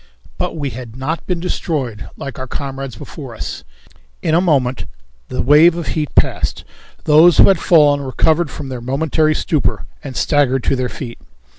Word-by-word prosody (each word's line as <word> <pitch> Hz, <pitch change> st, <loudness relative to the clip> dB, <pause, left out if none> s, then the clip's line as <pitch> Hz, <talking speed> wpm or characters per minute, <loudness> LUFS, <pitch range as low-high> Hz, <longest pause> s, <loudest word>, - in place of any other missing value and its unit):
But -, -, -2 dB
we 140 Hz, -3 st, -3 dB
had 120 Hz, -1 st, -9 dB
not 145 Hz, +6 st, -4 dB
been 180 Hz, -2 st, -1 dB
destroyed 140 Hz, -10 st, -3 dB
like 140 Hz, -1 st, -7 dB
our 130 Hz, -, -5 dB
comrades 135 Hz, -2 st, -5 dB
before -, -, -9 dB
us. -, -, -6 dB, 0.6 s
In 155 Hz, -, +1 dB
a 170 Hz, -, +4 dB
moment 135 Hz, -8 st, +1 dB, 0.4 s
the -, -, -2 dB
wave 155 Hz, +5 st, +6 dB
of 170 Hz, -2 st, -4 dB
heat 150 Hz, -3 st, -3 dB
passed; -, -, +1 dB, 0.4 s
those 155 Hz, +2 st, +6 dB
who -, -, +8 dB
had 190 Hz, -3 st, +3 dB
fallen 145 Hz, -4 st, +4 dB
recovered 155 Hz, +4 st, +1 dB
from 135 Hz, 0 st, -7 dB
their 125 Hz, -2 st, -6 dB
momentary 155 Hz, +4 st, +1 dB
stupor 155 Hz, -1 st, -1 dB, 0.2 s
and 135 Hz, -3 st, -7 dB
staggered 135 Hz, -3 st, +2 dB
to -, -, +1 dB
their 125 Hz, -1 st, -2 dB
feet. 120 Hz, -4 st, -8 dB
145 Hz, 170 wpm, -17 LUFS, 130-160 Hz, 0.6 s, who